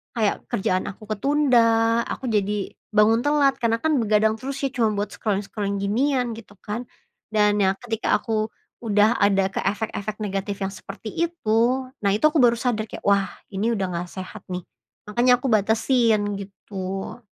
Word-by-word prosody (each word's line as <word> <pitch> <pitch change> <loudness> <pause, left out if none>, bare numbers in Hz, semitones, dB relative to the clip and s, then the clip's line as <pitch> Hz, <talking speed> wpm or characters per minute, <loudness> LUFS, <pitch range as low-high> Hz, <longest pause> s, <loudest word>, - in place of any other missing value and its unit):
kayak 215 -3 0
kerjaan 185 -1 0
aku 215 +2 -11
ketunda, 230 -2 +3
aku 260 - -4
jadi 205 -2 0 0.2
bangun 220 +2 +4
telat 290 -2 +3
karena 230 0 +2
kan 315 -2 +2
begadang 215 0 +3
terus 275 +1 -5
ya 275 - +2
cuman 225 -5 +1
buat 205 0 -2
scrolling-scrolling 200 -1 -2
ginian 245 +4 +1
gitu 205 -3 -13
kan. 225 +4 -4 0.5
Dan 210 -1 +3
ya 190 0 +3
ketika 225 -2 0
aku 220 -2 -2 0.3
udah 215 0 +3
ada 195 -1 +3
ke - - -3
efek-efek 210 0 -2
negatif 200 0 -3
yang 195 - -2
seperti 215 +3 -8 0.2
itu, 250 -3 +1 0.2
nah, 200 -1 +2
itu 210 - -2
aku 310 - 0
baru 240 -2 +5
sadar 230 -3 -1
kayak, - - -9
wah, 200 -1 +4 0.3
ini 215 +4 0
udah 190 -3 -1
nggak 175 0 -4
sehat, 185 -1 -8
nih. 180 - -3 0.5
Makanya 245 +3 +4
aku 270 - -1
batasin, 220 -1 +2
gitu. 195 0 -6
215 Hz, 165 wpm, -23 LUFS, 200-235 Hz, 0.5 s, baru